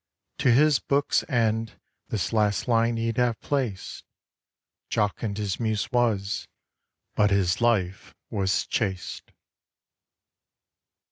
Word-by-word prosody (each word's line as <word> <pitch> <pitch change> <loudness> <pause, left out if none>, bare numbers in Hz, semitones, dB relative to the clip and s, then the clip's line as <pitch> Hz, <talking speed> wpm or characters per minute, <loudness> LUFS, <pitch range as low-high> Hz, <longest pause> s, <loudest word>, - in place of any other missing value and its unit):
To 125 - +4
his 145 +3 +5
book's 140 +1 +1
end 115 -3 +1 0.3
this 110 +1 -2
last 105 -2 +1
line 115 -1 +2
he'd 115 0 -2
have 120 -2 +1
placed: 125 -10 -3 0.9
Jocund 105 0 -1
his 105 -3 -2
Muse 110 -3 -1
was, 110 -5 0 0.7
but 105 -1 +3
his 100 0 +1
Life 105 -4 0 0.2
was 100 -3 0
chaste. 95 -5 -3
110 Hz, 105 wpm, -26 LUFS, 100-120 Hz, 0.9 s, his